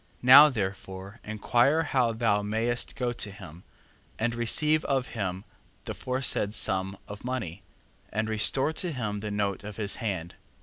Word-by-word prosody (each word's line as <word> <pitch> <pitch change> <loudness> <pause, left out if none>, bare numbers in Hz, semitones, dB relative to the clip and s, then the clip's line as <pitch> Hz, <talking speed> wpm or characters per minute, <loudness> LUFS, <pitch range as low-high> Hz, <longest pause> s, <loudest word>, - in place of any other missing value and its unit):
Now 140 +4 +9
therefore 95 -2 -5
inquire 120 +8 +1
how 130 -5 +1
thou 110 -3 +1
mayst 115 +3 -2
go 125 -1 -2
to 110 - -4
him, 90 -4 -12 0.5
and 115 +1 -1
receive 150 +7 +2
of 135 -2 -1
him 95 -4 -4 0.4
the - - -4
foresaid 125 -5 0
sum 95 -1 0
of 105 0 -9
money, 110 -8 -4 0.5
and 110 +2 -1
restore 130 +7 +2
to 175 +2 -1
him 105 -6 -3
the 105 +1 -5
note 100 -2 -2
of 105 -1 -8
his 105 -2 -1
hand. 95 -7 -4
110 Hz, 150 wpm, -27 LUFS, 100-125 Hz, 0.5 s, Now